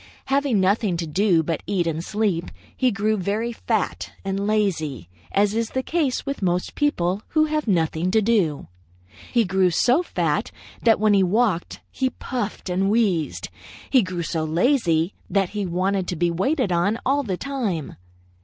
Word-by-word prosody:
Having 275 Hz, -6 st, +2 dB
nothing 190 Hz, -1 st, +2 dB
to 165 Hz, -, -2 dB
do 170 Hz, +1 st, +2 dB
but 165 Hz, 0 st, -2 dB
eat 185 Hz, -4 st, 0 dB
and 165 Hz, 0 st, -2 dB
sleep, 200 Hz, -4 st, 0 dB, 0.3 s
he 255 Hz, -, +2 dB
grew 215 Hz, 0 st, 0 dB
very 210 Hz, +5 st, -1 dB
fat 230 Hz, -, -2 dB
and 195 Hz, +1 st, -1 dB
lazy, 160 Hz, -, -1 dB, 0.2 s
as 205 Hz, +1 st, +2 dB
is 230 Hz, 0 st, -1 dB
the 260 Hz, -, -2 dB
case 305 Hz, -5 st, -1 dB
with 275 Hz, -3 st, -4 dB
most 180 Hz, -1 st, 0 dB
people 195 Hz, -10 st, 0 dB
who 310 Hz, 0 st, +2 dB
have 305 Hz, -3 st, -2 dB
nothing 165 Hz, -2 st, +1 dB
to 220 Hz, +4 st, +3 dB
do. 195 Hz, -, +1 dB, 0.6 s
He 235 Hz, -2 st, +3 dB
grew 190 Hz, 0 st, +2 dB
so 245 Hz, -, +3 dB
fat 360 Hz, -, -1 dB, 0.3 s
that 225 Hz, -3 st, +4 dB
when 215 Hz, 0 st, +4 dB
he 195 Hz, -, +5 dB
walked, 190 Hz, -1 st, +1 dB
he 260 Hz, -1 st, 0 dB
puffed 245 Hz, -6 st, -5 dB
and 190 Hz, +2 st, +1 dB
wheezed. 200 Hz, -8 st, 0 dB, 0.4 s
He 260 Hz, -, +6 dB
grew 185 Hz, -3 st, -3 dB
so 160 Hz, 0 st, -2 dB
lazy 170 Hz, -, +2 dB, 0.2 s
that 195 Hz, -2 st, +1 dB
he 205 Hz, -2 st, -3 dB
wanted 185 Hz, +2 st, 0 dB
to 180 Hz, -, -2 dB
be 170 Hz, +1 st, +1 dB
waited 235 Hz, -, 0 dB
on 175 Hz, +6 st, +1 dB
all 280 Hz, +2 st, +2 dB
the 195 Hz, -9 st, -3 dB
time. 225 Hz, -, -3 dB
200 Hz, 170 wpm, -23 LUFS, 175-235 Hz, 0.6 s, He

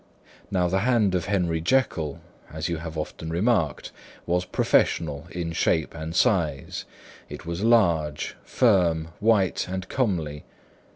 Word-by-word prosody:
Now 90 Hz, -2 st, +1 dB
the 95 Hz, +2 st, +1 dB
hand 110 Hz, -3 st, +2 dB
of 90 Hz, -2 st, 0 dB
Henry 90 Hz, -5 st, 0 dB
Jekyll 85 Hz, -, 0 dB, 0.3 s
(as 75 Hz, 0 st, -3 dB
you 85 Hz, -, -1 dB
have 80 Hz, 0 st, -7 dB
often 80 Hz, +1 st, -5 dB
remarked) 85 Hz, -, 0 dB, 0.3 s
was 90 Hz, +1 st, 0 dB
professional 75 Hz, -3 st, +1 dB
in 85 Hz, -2 st, -4 dB
shape 80 Hz, -1 st, +1 dB
and 80 Hz, 0 st, -6 dB
size; 85 Hz, -, +1 dB, 0.4 s
it -, -, -9 dB
was 85 Hz, +2 st, -4 dB
large, 85 Hz, -10 st, +2 dB
firm, 85 Hz, -9 st, +2 dB
white 105 Hz, -6 st, +2 dB
and 95 Hz, 0 st, -4 dB
comely. 85 Hz, -, -1 dB
85 Hz, 130 wpm, -25 LUFS, 80-100 Hz, 0.4 s, hand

